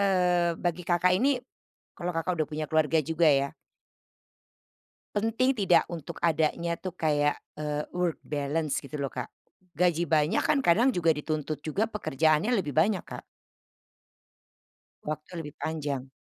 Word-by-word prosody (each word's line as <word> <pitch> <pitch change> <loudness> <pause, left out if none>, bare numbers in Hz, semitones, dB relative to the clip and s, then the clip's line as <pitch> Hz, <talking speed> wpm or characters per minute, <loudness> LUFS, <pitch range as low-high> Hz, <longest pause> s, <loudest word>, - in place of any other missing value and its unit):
eee, 180 -3 +2
bagi 175 0 -1
Kakak 175 +1 +2
ini 265 +6 +2 0.6
kalau 175 -1 -3
Kakak 170 +1 -1
udah 155 - +1
punya 155 0 -3
keluarga 160 0 +3
juga 160 +3 +1
ya? 140 -2 +4 1.7
Penting 230 +5 +1
tidak 185 -5 +3
untuk 170 -4 -7
adanya 170 +1 +1
tuh 185 +2 -6
kayak, 150 -4 +1 0.2
eee, 150 0 -3
work 180 -2 0
balance 150 +1 -2
gitu 150 +2 -7
loh, 140 - -1
Kak. 125 -2 -6 0.4
Gaji 175 0 +2
banyak 155 -2 +2
kan 285 - +2
kadang 240 +3 +4
juga 165 - +2
dituntut 150 -1 -3
juga 195 +8 0
pekerjaannya 160 - +1
lebih 165 - 0
banyak, 190 +5 +3
Kak. - - -8 1.8
Waktu 155 +2 -5
lebih 150 - -9
panjang. 145 -4 -3
165 Hz, 135 wpm, -28 LUFS, 150-180 Hz, 1.8 s, ya